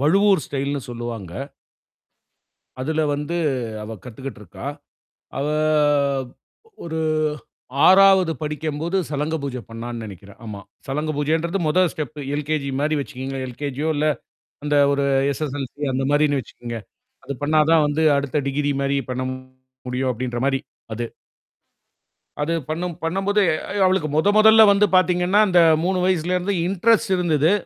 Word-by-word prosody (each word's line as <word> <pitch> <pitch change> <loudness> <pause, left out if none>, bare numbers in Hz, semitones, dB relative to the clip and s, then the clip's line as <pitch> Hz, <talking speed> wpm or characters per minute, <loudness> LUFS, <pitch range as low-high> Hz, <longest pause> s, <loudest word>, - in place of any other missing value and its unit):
வழுவூர் 195 +4 +4
ஸ்டைல்ன்னு 140 0 -3
சொல்லுவாங்க. 115 -7 -6 1.5
அதில 160 +4 0
வந்து 150 +4 -4 0.5
அவ 110 +1 -7
கத்துகிட்டு 125 0 -8
இருக்கா. 95 +5 -10 0.7
அவ 140 - -1 1.4
ஒரு 160 -1 -3 0.9
6வது 190 -2 +6
படிக்கும்போது 155 +3 -2
சலங்க 150 +2 -1
பூஜை 130 -3 -4
பண்ணான்னு 115 0 -6
நினைக்கிறேன். 100 -1 -12
ஆமா. 105 -2 -7 0.3
சலங்க 150 +3 -2
பூஜைன்றது 160 +5 0
முதல் 180 +2 +3
ஸ்டெப், 150 0 -6 0.2
எல்கேஜி 150 -1 -2
மாரி 155 +1 +1
வச்சுகங்களேன். 135 -1 -5
எல்கேஜியோ 145 +4 -3
இல்ல 150 +1 +2 0.6
அந்த 150 0 0 0.2
ஒரு 140 0 0 0.3
எஸ்-எஸ்-எல்-சி 145 -1 -5
அந்த 135 +1 0
மாதிரின்னு 145 -1 +3
வச்சுகங்க. 120 -1 -8 0.5
அது 140 - -5
பண்ணா 155 +2 +3
தான் 160 -2 +5
வந்து 150 +2 0
அடுத்த 140 +1 -1
டிகிரி 145 +1 0
மாதிரி 140 0 +1
பண்ண 130 0 -2 0.6
முடியும் 130 +1 -1
அப்பிடின்றமாரி 125 +3 -1 0.3
அது. 120 +2 -3 1.3
அது 155 +3 0 0.2
பண்ணும் 170 +1 -3
பண்ணும்போது, 195 +5 +1
எ - - 0 0.3
அவளுக்கு 185 -5 +1
முதன் 205 +6 +3
முதல்ல 220 0 +8
வந்து 200 +1 +4
பார்த்தீங்கன்னா, 180 +3 +3
அந்த 180 -2 +5 0.2
3 185 +1 +1
வயசிலருந்து 180 +2 0
இன்ட்ரெஸ்ட் 210 +2 +2
இருந்தது. 160 -2 +2
150 Hz, 125 wpm, -22 LUFS, 135-175 Hz, 1.5 s, முதல்ல